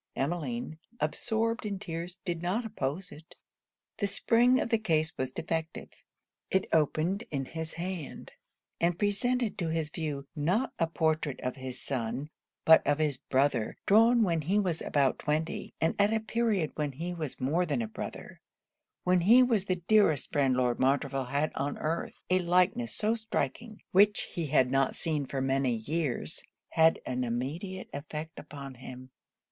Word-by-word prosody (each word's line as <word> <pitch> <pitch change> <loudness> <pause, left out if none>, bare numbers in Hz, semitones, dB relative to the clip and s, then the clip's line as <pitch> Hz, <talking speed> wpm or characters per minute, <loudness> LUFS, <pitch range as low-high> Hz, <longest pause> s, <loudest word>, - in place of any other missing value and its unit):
Emmeline, 175 - -3 0.2
absorbed 230 +1 -1
in 205 -2 -3
tears, 175 -1 -5
did 170 -3 -2
not 195 +7 -1
oppose 180 -3 -3
it. 155 +2 -13 0.6
The 205 - +1
spring 240 +5 +3
of - - -1
the 225 -2 +2
case 160 -6 0
was 130 0 -2
defective. 160 +4 -4 0.6
It 190 - +2
opened 165 +6 +2
in 135 -2 -2
his 160 +3 -5
hand; 175 -3 -6 0.5
and 170 0 +2
presented 225 +4 +1
to 170 - -1
his 160 -2 -1
view, 150 -4 -4
not 180 - 0
a 165 - +3
portrait 160 -3 0
of 125 - -2
his 130 -2 -6
son, 130 +3 -3 0.3
but 160 0 +8
of 145 - +3
his 150 -4 0
brother, 135 -4 +1
drawn 230 +3 +6
when 170 -5 +1
he 180 +7 +1
was 180 -6 0
about 140 -2 +1
twenty, 155 +2 -2
and 160 - +2
at 205 +1 +4
a 225 - +2
period 220 -7 0
when 150 -2 -2
he 170 +6 -4
was 155 -6 -5
more 160 +8 +1
than 140 -6 0
a - - -3
brother 110 - -8 0.6
when 180 0 +4
he 230 +9 +7
was 225 -6 +2
the 185 - +1
dearest 205 - +3
friend 135 -3 +3
Lord 125 -1 +1
Montreville 135 0 +1
had 140 +5 0
on 140 +1 -2
earth. 165 +2 -2 0.2
A 185 - +5
likeness 185 +7 +2
so 215 +1 +1
striking, 220 0 -3
which 205 +3 +5
he 170 -3 -2
had 130 -2 +3
not 135 0 +2
seen 150 -4 -1
for 135 0 -2
many 135 -2 +1
years, 140 +4 -2 0.3
had 160 0 +4
an 125 0 -1
immediate 150 - -4
effect 155 +2 -6
upon 140 -2 -9
him. 130 0 -10
160 Hz, 165 wpm, -30 LUFS, 140-195 Hz, 0.6 s, but